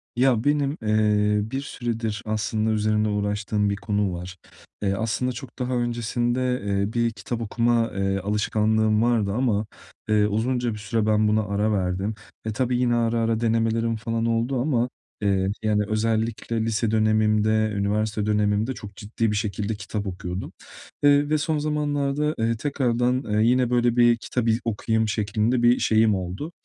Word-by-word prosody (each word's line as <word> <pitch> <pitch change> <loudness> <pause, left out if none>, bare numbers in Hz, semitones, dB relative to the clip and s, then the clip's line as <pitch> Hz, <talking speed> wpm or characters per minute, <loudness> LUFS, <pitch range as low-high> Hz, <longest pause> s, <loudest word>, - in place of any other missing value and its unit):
Ya, 125 -2 +3
benim, 145 0 +1
eee, 105 0 +2
bir 135 +1 -2
süredir 115 -5 -3
aslında 110 0 -1
üzerinde 110 0 +1
uğraştığım 105 0 -1
bir 100 - 0
konu 100 -1 -1
var. 90 +2 -7 0.4
E, 100 -2 +1
aslında 110 +4 -1
çok 125 +1 -10
daha 125 0 -2
öncesinde, 120 +1 -1
eee, 100 +1 -1
bir 115 -1 +1
kitap 110 +3 -5
okuma, 115 +1 +1
eee, 95 0 0
alışkanlığım 105 +2 +1
vardı 115 -4 +2
ama, 110 -3 +1 0.4
eee, 105 -1 +4
uzunca 120 +2 0
bir 105 - -6
süre 110 +1 -1
ben 110 0 +3
buna 110 +1 +2
ara 100 +2 0
verdim 95 +1 -1 0.3
ve 110 - -2
tabii 125 +2 0
yine 125 -1 +2
ara 115 0 +1
ara 115 -1 +1
denemelerim 115 0 +1
falan 115 +1 -2
oldu 115 +3 0
ama, 125 -4 +1 0.3
eee, 95 -1 +1
yani, 105 -1 +2
özellikle 110 +1 -1
lise 115 0 0
dönemimde, 110 0 +2
üniversite 105 +1 0
dönemimde 105 +3 +1
çok 105 -4 -10
ciddi 110 +2 -2
bir - - -1
şekilde 105 0 -2
kitap 105 0 -5
okuyordum. 90 0 -5 0.5
Eee, 145 - +7 0.2
bir - - -8
de 155 - +3
son 155 +1 -1
zamanlarda, 150 0 -1
eee, 115 +1 +1
tekrardan, 125 -1 0
eee, 105 0 +1
yine 125 +1 +3
böyle 120 -1 +2
bir 120 -1 +5
kitap 120 +1 -3
iz 115 0 +2
okuyayım 110 0 0
şeklinde 110 +3 0
bir 120 +1 +5
şeyim 110 -1 +3
oldu. 95 - -5
110 Hz, 160 wpm, -24 LUFS, 105-120 Hz, 0.5 s, Eee